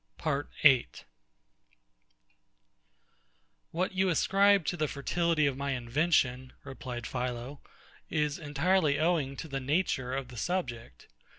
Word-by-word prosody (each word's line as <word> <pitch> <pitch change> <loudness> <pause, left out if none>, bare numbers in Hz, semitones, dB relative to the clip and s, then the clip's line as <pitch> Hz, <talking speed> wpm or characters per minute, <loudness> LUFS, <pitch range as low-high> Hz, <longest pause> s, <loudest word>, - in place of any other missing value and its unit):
PART 145 -3 -2
8 135 -5 +4 2.6
What 180 +3 -1
you 190 0 +1
ascribe 195 +2 +3
to 175 - -1
the 155 -3 0
fertility 165 +2 0
of 140 -2 0
my 140 0 -2
invention, 130 0 0
replied 125 -3 -7
PHILO, 125 +2 -4 0.5
is 150 0 -1
entirely 150 +1 +1
owing 155 -4 +1
to 160 - -6
the 135 -2 -3
nature 135 -3 -1
of 135 -2 -4
the 125 - -10
subject. 120 - -4
145 Hz, 115 wpm, -30 LUFS, 130-170 Hz, 2.6 s, 8